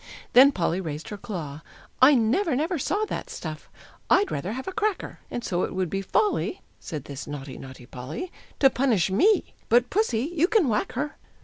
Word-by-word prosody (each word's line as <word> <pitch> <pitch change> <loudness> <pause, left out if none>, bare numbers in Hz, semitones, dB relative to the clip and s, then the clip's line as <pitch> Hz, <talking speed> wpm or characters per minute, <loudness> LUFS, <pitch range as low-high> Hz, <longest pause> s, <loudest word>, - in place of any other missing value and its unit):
Then 270 +3 +8
Polly 180 - -1
raised 155 -3 -5
her 210 - -5
claw! 165 -10 -6 0.4
"I 275 +3 +8
never, 260 - +2
never 320 +5 0
saw 410 +10 0
That - - -5
stuff. 155 -2 -7 0.4
I'd 400 0 +4
rather 185 +9 -3
have 260 +2 -6
a - - -2
cracker, 425 -1 -2
And 240 - -4
so 180 -5 -1
it - - -2
would 185 -3 -1
be 195 - -1
folly," 415 - 0 0.2
Said 150 -4 -6
this 140 -1 -7
naughty, 140 -2 -7
naughty 130 -2 -11
Polly, 135 - -7 0.3
"To 270 -1 +7
punish 225 -9 +2
me; 395 - +3 0.2
but 240 +1 +4
Pussy, 325 - +1
you 335 +2 +3
can 425 -7 +3
whack 210 -3 0
her." 295 +4 -3
235 Hz, 190 wpm, -26 LUFS, -, 0.4 s, Then